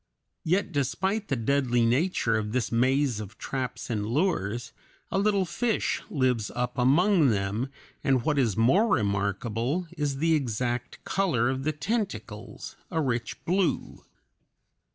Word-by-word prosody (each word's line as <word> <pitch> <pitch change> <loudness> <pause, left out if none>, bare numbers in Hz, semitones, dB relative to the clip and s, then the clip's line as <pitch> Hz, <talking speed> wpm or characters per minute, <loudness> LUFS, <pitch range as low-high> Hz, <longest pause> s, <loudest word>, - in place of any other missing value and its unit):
Yet 185 +3 +1
despite 190 - -1
the 135 - 0
deadly 125 -1 +2
nature 125 -1 +2
of 105 -1 -2
this 125 -2 0
maze 130 0 +2
of 105 0 -8
traps 130 -2 -4
and 110 -4 -1
lures, 115 - -1 0.4
a 195 - +1
little 200 -2 +2
fish 225 +5 -1
lives 125 -7 +1
up 125 0 -2
among 160 +6 +4
them, 105 +4 -1 0.3
and 130 -3 +2
what 150 0 +1
is 115 -7 +1
more 150 - +4
remarkable, 110 - 0
is 145 -3 -1
the 165 +3 +2
exact 125 -3 -2
color 135 -11 +1
of 135 +1 -4
the 155 - +2
tentacles, 145 - -4
a 160 - -1
rich 120 -6 -2
blue. 185 0 0
130 Hz, 135 wpm, -27 LUFS, 115-165 Hz, 0.4 s, among